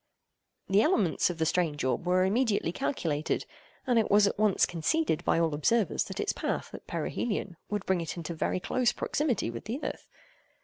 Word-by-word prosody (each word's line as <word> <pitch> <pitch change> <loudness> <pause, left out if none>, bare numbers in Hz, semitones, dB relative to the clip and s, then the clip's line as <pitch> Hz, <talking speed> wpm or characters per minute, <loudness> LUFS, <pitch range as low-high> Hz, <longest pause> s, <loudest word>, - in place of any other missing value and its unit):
The 195 +2 +4
elements 210 - +2
of 175 - -4
the 160 - +1
strange 160 -3 0
orb 130 +6 -1
were 185 +1 +3
immediately 210 -4 +1
calculated, 165 - -1 0.4
and 245 -3 +3
it 220 - 0
was 205 0 +6
at 200 - -1
once 215 -3 +4
conceded 180 - 0
by - - +2
all 165 -2 +1
observers, 205 +9 +1
that - - -7
its - - 0
path, - - -3
at - - -10
perihelion, 205 -6 -2
would 205 -1 -2
bring 190 -2 +1
it 165 +1 -5
into 170 0 -4
very 165 +3 -1
close 245 +5 +1
proximity 255 - -1
with 115 - -8
the 230 +6 -3
earth. - - -5
190 Hz, 185 wpm, -29 LUFS, 165-225 Hz, 0.4 s, was